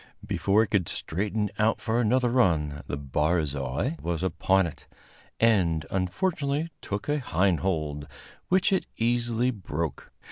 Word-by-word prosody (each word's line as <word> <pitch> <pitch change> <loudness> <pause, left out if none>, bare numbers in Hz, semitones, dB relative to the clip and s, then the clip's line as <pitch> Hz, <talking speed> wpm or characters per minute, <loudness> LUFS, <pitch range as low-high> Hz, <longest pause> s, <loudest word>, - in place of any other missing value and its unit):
Before 100 +3 +2
it 115 - -4
could 95 -6 +1
straighten 105 +4 -2
out 110 +1 +2
for 115 +1 0
another 120 +2 +2
run, 80 - +2
the 70 - -3
barzoi 75 - -1
was 85 0 -2
upon 95 +1 +2
it, 85 - -8 0.5
and 90 -9 +3
unfortunately 140 - -1
took 100 0 -4
a 150 0 +1
hind 95 - +1
hold, 75 -6 -2 0.4
which 185 +2 +3
it 190 - 0
easily 120 +1 +1
broke. 85 - -4
95 Hz, 135 wpm, -27 LUFS, 80-120 Hz, 0.5 s, and